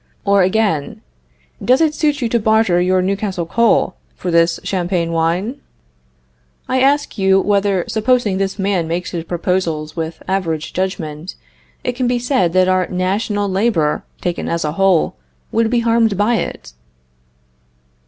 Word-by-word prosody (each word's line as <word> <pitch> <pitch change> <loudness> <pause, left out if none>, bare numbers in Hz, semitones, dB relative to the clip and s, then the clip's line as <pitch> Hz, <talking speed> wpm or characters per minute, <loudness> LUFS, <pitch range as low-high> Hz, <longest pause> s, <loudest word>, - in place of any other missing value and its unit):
or, 200 -1 +4
again, 185 -6 0 0.6
Does 255 +2 +4
it 315 -2 +2
suit 295 -3 0
you 235 - 0
to 235 - +1
barter 220 -5 +3
your 185 +1 +2
Newcastle 195 -2 -2
coal 230 0 +2 0.2
for 180 - -4
this 170 0 +3
Champagne 175 -2 -1
wine? 175 - -1 1.1
I 260 0 +1
ask 280 -3 +1
you 190 0 +4
whether, 200 -2 +1
supposing 220 -3 +1
this 195 0 -2
man 195 -4 0
makes 170 +2 -3
his 170 -2 -4
proposals 170 -3 -2
with 160 -1 -5
average 165 -5 -2
judgment, 175 -3 -4 0.5
it - - 0
can 250 0 -2
be 245 0 +1
said 240 - +1
that 185 0 +4
our 185 -1 +2
national 200 +3 -1
labor, 190 -6 +1 0.2
taken 175 -1 -2
as 170 -1 -1
a 150 - -1
whole, 190 0 +2 0.3
would 225 0 +1
be 240 0 +1
harmed 230 -3 +2
by 220 +3 +2
it? 60 - -5
190 Hz, 150 wpm, -18 LUFS, 175-225 Hz, 1.1 s, or